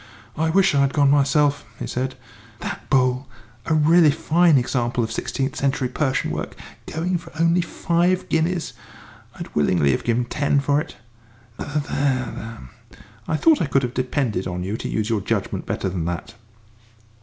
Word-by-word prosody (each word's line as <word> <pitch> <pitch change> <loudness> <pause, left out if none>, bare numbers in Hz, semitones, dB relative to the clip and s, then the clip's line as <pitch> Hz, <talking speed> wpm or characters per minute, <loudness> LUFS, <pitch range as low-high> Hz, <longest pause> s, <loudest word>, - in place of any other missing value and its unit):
"I 160 +1 0
wish 195 +2 +4
I'd 140 -1 +2
gone 140 -2 +4
myself," 145 0 +3
he - - -5
said; 130 +1 -3 0.5
"that - - -6
bowl, 130 -1 +2 0.4
a 160 - +2
really 160 +1 +5
fine 160 +1 +3
example 120 -1 0
of 110 - -3
sixteenth 135 +4 -2
century 135 -2 0
Persian 135 0 -1
work, - - -4 0.3
going 175 +2 -1
for 170 0 -13
only 170 +2 +3
five 175 +2 0
guineas! 165 +1 0 0.6
I'd - - -8
willingly 75 -1 +3
have 65 - -1
given 120 +1 +1
ten 145 +2 +1
for 140 +2 +2
it. - - -9 0.6
There, 145 0 -2
there, 130 -5 -2 0.7
I 160 - 0
thought 320 - +4
I - - +1
could 135 0 +2
have 125 -1 -2
depended 125 -7 -1
on 90 0 -4
you 100 +3 -3
to - - -5
use 110 -1 -1
your 110 -3 0
judgment - - -2
better - - -2
than 90 -3 -3
that!" 85 0 -4
140 Hz, 165 wpm, -22 LUFS, 120-160 Hz, 0.7 s, really